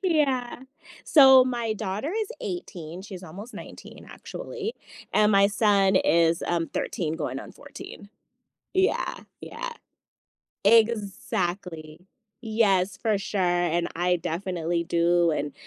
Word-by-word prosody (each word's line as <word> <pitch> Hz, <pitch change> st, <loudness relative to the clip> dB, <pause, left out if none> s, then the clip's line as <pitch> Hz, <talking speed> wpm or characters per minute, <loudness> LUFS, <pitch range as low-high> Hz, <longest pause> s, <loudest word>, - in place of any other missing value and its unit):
Yeah. 275 Hz, -9 st, 0 dB, 0.4 s
So 265 Hz, -4 st, +8 dB
my 240 Hz, -3 st, -2 dB
daughter 215 Hz, -, -3 dB
is 435 Hz, -1 st, -2 dB
18, 190 Hz, -, -6 dB
she's 190 Hz, -3 st, -9 dB
almost 195 Hz, +8 st, -10 dB
19 -, -, -11 dB
actually, 450 Hz, -1 st, -6 dB, 0.4 s
and 210 Hz, 0 st, +4 dB
my 200 Hz, 0 st, +6 dB
son 200 Hz, -2 st, +3 dB
is, 165 Hz, -2 st, +3 dB
um, 170 Hz, -1 st, 0 dB
13 160 Hz, -3 st, -3 dB
going -, -, -4 dB
on -, -, -10 dB
14. 200 Hz, -, -11 dB, 0.7 s
Yeah, 380 Hz, +1 st, +1 dB, 0.3 s
yeah. -, -, -6 dB, 1.0 s
Exactly, 190 Hz, -7 st, +1 dB, 0.4 s
yes, 210 Hz, -5 st, +1 dB
for 215 Hz, -3 st, 0 dB
sure, 195 Hz, +1 st, -4 dB
and 175 Hz, -1 st, +1 dB
I 180 Hz, +1 st, +1 dB
definitely 170 Hz, 0 st, -2 dB
do, 170 Hz, 0 st, +2 dB
and, 150 Hz, -1 st, -3 dB
195 Hz, 115 wpm, -26 LUFS, 175-235 Hz, 1.0 s, So